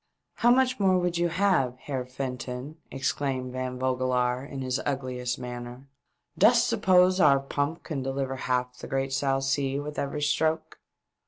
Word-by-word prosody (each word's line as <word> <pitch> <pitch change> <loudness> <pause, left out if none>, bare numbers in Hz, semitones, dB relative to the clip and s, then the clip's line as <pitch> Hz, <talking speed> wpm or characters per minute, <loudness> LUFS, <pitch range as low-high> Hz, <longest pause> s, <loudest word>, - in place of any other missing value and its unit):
" - - -55
How 240 - +5
much 255 0 +3
more 190 -2 +4
would 175 -1 0
you 175 0 +2
have, 170 -9 +1
Heer 130 -2 -4
Fenton 125 +2 -5
?" - - -39
exclaimed 135 -1 -2
Van 130 0 -4
Vogelaar, 125 -1 0
in 135 -1 -6
his 130 +1 -1
'Ugliest 130 -3 -2
manner. 125 +1 -7 0.2
" - - -51
Dost - - +6
suppose 185 0 +4
our 140 -6 +6
pump 145 +4 -3
can 145 -4 -4
deliver 135 0 -2
half 125 -1 -1
the - - -7
great 135 0 -1
South 135 0 +1
Sea 135 0 0
with 150 +1 -5
every 145 +1 -2
stroke 155 +2 0
135 Hz, 170 wpm, -27 LUFS, 130-150 Hz, 0.2 s, Dost